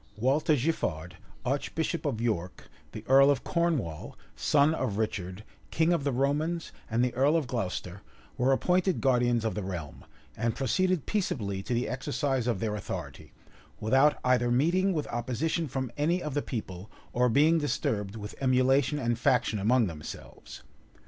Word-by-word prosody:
Walter 140 +7 +2
Giffard, 90 - -2 0.3
archbishop 155 +4 -1
of 115 -6 -2
York, 105 -7 -3 0.2
the - - -8
earl 135 +1 +7
of 140 -2 +1
Cornwall, 160 - -1 0.2
son 145 +1 +3
of 105 -10 -2
Richard, 100 -3 -3 0.3
king 165 +2 +2
of 170 - 0
the 140 - 0
Romans, 150 +6 -1 0.2
and 120 +2 +2
the 125 - -2
earl 140 +6 +3
of 160 - -1
Glocester, 100 -5 -4 0.3
were 130 +2 +2
appointed 180 +6 +2
guardians 120 -3 +2
of 110 - 0
the 105 - -3
realm, 90 -6 -6 0.3
and 115 0 -1
proceeded 180 +5 +1
peaceably 105 - -2
to 120 - -2
the 120 - 0
exercise 135 -1 -1
of 115 -6 0
their 110 0 -1
authority, 105 - -7 0.5
without 135 +7 +3
either 125 -1 +2
meeting 170 +10 +2
with 155 -5 -1
opposition 130 +8 -2
from 130 -2 -3
any 165 +5 +1
of 150 - -4
the 145 - 0
people, 100 -6 -6 0.2
or 125 0 +3
being 155 +7 +4
disturbed 105 -8 -2
with 105 -1 -7
emulation 130 +2 +3
and 120 -4 -1
faction 110 -3 +2
among 115 +4 +3
themselves. 80 -5 -9
125 Hz, 155 wpm, -28 LUFS, 110-150 Hz, 0.5 s, earl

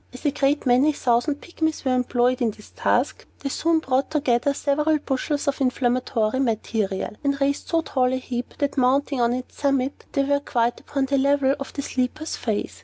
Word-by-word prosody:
As 250 +4 -12
a 290 - +3
great 285 +1 +1
many 260 +5 +4
thousand 270 +3 +1
Pygmies 315 -4 -2
were 260 - +2
employed 250 0 +1
in 235 - +3
this 210 0 -12
task, - - 0
they 275 - -2
soon 330 +4 +1
brought 270 -3 0
together 280 -3 +1
several 300 +2 +1
bushels 285 +1 -2
of 280 0 0
inflammatory 250 -2 +1
matter, 215 -5 -1
and 280 -1 0
raised 280 0 0
so 330 -1 +2
tall 255 -4 +1
a - - +1
heap, 250 -1 -5
that, 285 0 -1
mounting 270 +1 +2
on 235 0 +3
its 250 +1 -5
summit, 275 -1 0
they 275 - +2
were 285 +1 +2
quite 240 -4 0
upon 275 -2 -2
a 275 - +3
level 275 0 +3
with 275 - -7
the 280 - -4
sleeper's 265 +6 -2
face. 215 -3 -3
270 Hz, 190 wpm, -24 LUFS, 250-285 Hz, -, many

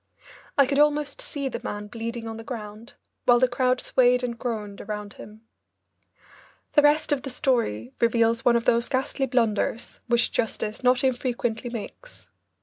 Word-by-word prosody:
I 280 - +7
could 275 +2 0
almost 295 - +2
see 295 - -4
the 265 - -5
man 205 0 -4
bleeding 230 +2 -5
on 225 0 -6
the 225 - -8
ground, 220 -1 -8 0.3
while 245 -1 +6
the 255 +1 +4
crowd 255 0 +1
swayed 250 0 +3
and 240 -1 -2
groaned 220 -4 -5
around 210 0 -6
him. 215 +1 -12 1.3
The 295 - +6
rest 295 +1 +3
of 285 -2 +1
the 270 - -6
story 230 - -1
reveals 230 0 +2
one 240 - +4
of 235 - +1
those 235 0 +2
ghastly 270 0 -1
blunders 230 -2 -1
which 240 0 +2
justice 220 -1 -2
not 250 +1 +3
infrequently 245 -2 -1
makes. 240 - -9
240 Hz, 160 wpm, -25 LUFS, 225-260 Hz, 1.3 s, I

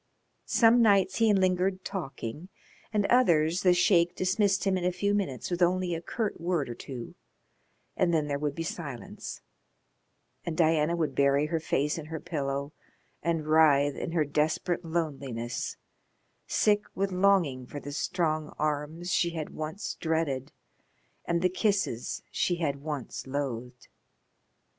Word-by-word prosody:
Some 235 +1 +5
nights 200 -4 +4
he 225 -1 +4
lingered 185 -1 +1
talking, 155 - -5 0.4
and 210 -2 +1
others 175 -9 +3
the 180 - +5
Sheik 175 -1 +3
dismissed 195 +1 +1
him 195 -1 +2
in 185 - -2
a 180 - +2
few 200 +3 0
minutes 185 -9 -2
with 175 0 -2
only 180 0 +2
a 165 - -3
curt 210 +1 -3
word 170 -6 0
or - - -3
two, 120 0 -8 0.8
and 180 -2 +2
then 160 -3 +2
there 140 -1 -1
would 145 -1 -2
be 165 - -3
silence, 145 -7 -6 1.0
and 165 -2 -4
Diana 160 0 +3
would 165 -3 -1
bury 140 +1 +3
her 160 +1 -1
face 150 0 0
in 155 - -8
her 160 0 -5
pillow 140 +1 -3 0.5
and 165 -2 -1
writhe 150 -2 +5
in 165 - -4
her 160 -3 +2
desperate 155 +5 0
loneliness, 140 -8 -3 0.7
sick 210 0 +2
with 195 0 0
longing 180 -9 +2
for 145 - -6
the 145 - -7
strong 155 0 -1
arms 155 +4 -2
she 170 -1 +1
had 155 -2 -4
once 155 +6 -4
dreaded 160 -5 -1 0.7
and 170 0 0
the - - +6
kisses 185 - -1
she 175 - +1
had 150 -5 -1
once 145 -3 -5
loathed. 125 -3 -4
165 Hz, 150 wpm, -29 LUFS, 145-185 Hz, 1.0 s, the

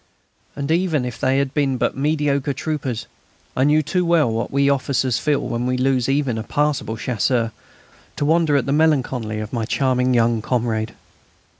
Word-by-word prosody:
And, 140 +1 -3
even 165 -6 +1
if 125 -2 -6
they 130 +1 +2
had 140 -1 0
been 140 -3 +1
but - - 0
mediocre 145 -1 0
troopers, 135 -7 -3 0.5
I 130 - +2
knew 150 +1 +3
too 180 +5 0
well 165 -8 +3
what 115 +1 -2
we 140 0 +2
officers 130 -3 +1
feel 150 -2 +1
when 120 +1 -2
we 125 0 0
lose 130 -1 +1
even 135 -5 0
a - - -4
passable 145 -5 -1
Chasseur, 115 0 0 0.6
to 145 - -1
wonder 160 -1 +3
at 130 - 0
the 140 - -1
melancholy 130 -8 +1
of 110 +2 -6
my 115 -2 -1
charming 130 0 +1
young 115 -1 +2
comrade. 115 -2 -1
135 Hz, 175 wpm, -21 LUFS, 120-145 Hz, 0.6 s, knew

